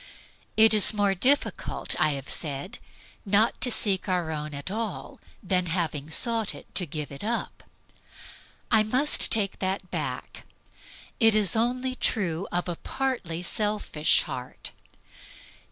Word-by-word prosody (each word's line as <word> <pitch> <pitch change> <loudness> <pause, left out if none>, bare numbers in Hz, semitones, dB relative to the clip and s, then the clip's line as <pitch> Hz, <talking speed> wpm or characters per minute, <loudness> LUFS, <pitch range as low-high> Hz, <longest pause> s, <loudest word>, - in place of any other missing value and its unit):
It 220 0 +7
is 215 0 +5
more 205 -1 +2
difficult, 265 +10 0
I 155 -1 +3
have 135 -1 -6
said, 155 - -3 0.4
not 210 +3 +2
to 250 - +4
seek 200 -4 +2
our 175 -3 0
own 150 -1 -4
at 140 +6 -6
all 220 -2 -5 0.2
than, 180 -1 0
having 160 -4 -2
sought 225 +5 0
it, - - -14
to 180 -2 +1
give 150 0 -5
it 140 - -8
up. 230 +2 -3 1.1
I 220 -2 +6
must 255 +7 +3
take 200 -3 +1
that 190 -1 -2
back. - - -4 0.7
It 225 -2 +5
is 210 -3 +3
only 250 +3 0
true 190 -8 -1
of 175 +1 -2
a 175 -2 -4
partly 215 -11 -3
selfish 205 -6 +2
heart. 125 0 -7
195 Hz, 135 wpm, -26 LUFS, 165-225 Hz, 1.1 s, It